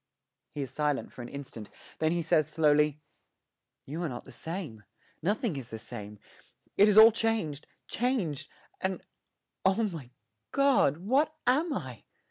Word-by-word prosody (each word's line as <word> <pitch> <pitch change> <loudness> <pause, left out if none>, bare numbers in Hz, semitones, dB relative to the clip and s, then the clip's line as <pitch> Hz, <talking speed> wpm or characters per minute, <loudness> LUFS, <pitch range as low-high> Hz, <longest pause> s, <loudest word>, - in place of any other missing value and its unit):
He 145 - -2
is 130 - -8
silent 150 -2 -1
for - - -10
an 120 - -7
instant; 130 -6 -8 0.3
then 155 0 +2
he 170 0 0
says 155 -2 +3
slowly, 150 -1 +3 0.8
'You 155 +5 -5
are 170 - -1
not 120 -2 -7
the - - -12
same 160 - -6 0.4
nothing 205 - 0
is 130 -4 -6
the 110 - -6
same: 105 -2 -8 0.6
it 205 +2 +6
is 210 - +3
all 220 +1 +11
changed 215 -10 -1 0.2
changed 190 - -1 0.3
and 190 0 -3 0.6
oh, 190 +4 +3
my 165 - -4 0.4
God, 275 - +3
what 270 - +1
am 295 +7 +2
I?' 130 - -5
160 Hz, 150 wpm, -29 LUFS, 140-215 Hz, 0.8 s, all